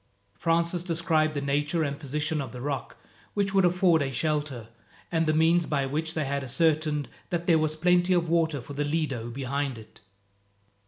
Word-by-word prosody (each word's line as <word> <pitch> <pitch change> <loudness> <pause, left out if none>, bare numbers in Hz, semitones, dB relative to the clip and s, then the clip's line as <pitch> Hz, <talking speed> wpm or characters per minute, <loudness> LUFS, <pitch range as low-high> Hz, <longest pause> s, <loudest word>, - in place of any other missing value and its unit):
Francis 170 - 0
described 165 -3 +1
the 145 - -1
nature 145 +4 0
and 140 -1 -3
position 150 +2 -2
of 135 - -6
the 125 - -8
rock 135 -1 -4 0.4
which 200 -1 0
would 195 -1 +4
afford 175 -2 +3
a 135 -1 -1
shelter, 145 -4 -2 0.4
and 165 -1 +1
the - - +4
means 165 +2 +3
by 140 -3 0
which 155 +4 -3
they 155 -2 0
had 140 0 -2
ascertained 150 +1 +1 0.2
that 175 -1 -2
there 165 -3 +4
was 155 0 0
plenty 180 +2 +3
of 175 -1 +2
water 160 -4 +1
for 145 - -9
the 145 +1 -1
Lido 145 -6 -2
behind 135 +1 -3
it. 110 - -14
155 Hz, 180 wpm, -27 LUFS, 140-165 Hz, 0.4 s, would